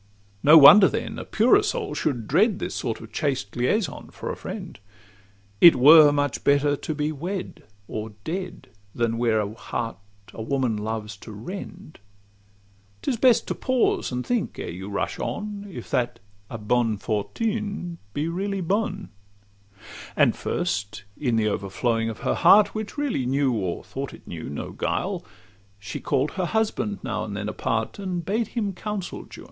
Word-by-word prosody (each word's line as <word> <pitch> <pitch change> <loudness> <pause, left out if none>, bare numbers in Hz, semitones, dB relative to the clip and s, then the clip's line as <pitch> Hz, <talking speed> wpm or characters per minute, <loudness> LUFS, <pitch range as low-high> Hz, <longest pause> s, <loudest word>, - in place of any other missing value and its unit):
No 155 +3 +8
wonder 190 +7 +10
then - - -3
a - - -5
purer 250 - +4
soul 425 0 -2
should 120 -8 -2
dread 195 - +3
This - - -4
sort 115 - -3
of 115 -1 -11
chaste 130 -5 -2
liaison 140 - -1
for - - -6
a - - -5
friend; - - -7 0.8
It 170 - +10
were 150 +3 +8
much 145 -2 -1
better 145 +1 +3
to 155 +2 -5
be 150 +1 -1
wed 175 +6 -5 0.3
or 110 0 -5
dead, 185 +2 -5 0.3
Than 115 -1 0
wear 115 -2 +2
a 105 0 -2
heart 115 -1 -4 0.4
a - - -7
woman 130 -1 0
loves 105 -1 -4
to 110 - -11
rend. 180 - -8 1.0
'Tis 260 - 0
best 245 0 +4
to - - +1
pause, 255 - 0
and 125 0 -3
think, 245 -3 -1
ere - - -5
you 95 +3 -7
rush 100 - -3
on, 205 -1 -4
If - - -9
that 120 -2 0 0.3
a 115 - -5
'bonne 115 0 +1
fortune' 190 - -3 0.2
be 150 +2 -1
really 195 +4 -2
'bonne.' 200 +2 -1 1.1
And - - +4
first, 100 -1 -3
in 125 -6 0
the 110 -1 +2
o'erflowing 115 +3 -1
of 110 - -7
her - - +1
heart, 205 +1 +6
Which 215 +5 -5
really 265 - -1
knew 135 0 +2
or 95 -7 -2
thought - - -6
it - - -20
knew - - -6
no 70 - -5
guile, - - -2 0.5
She 100 +1 -6
call'd 140 +3 0
her 185 -1 -2
husband 215 0 -1
now 115 -5 -2
and 100 -2 -5
then 105 0 -3
apart, 110 - -2
And 180 -4 -3
bade 220 +3 0
him 205 -4 0
counsel 205 0 -5
Juan. - - -10
145 Hz, 165 wpm, -24 LUFS, -, 1.1 s, wonder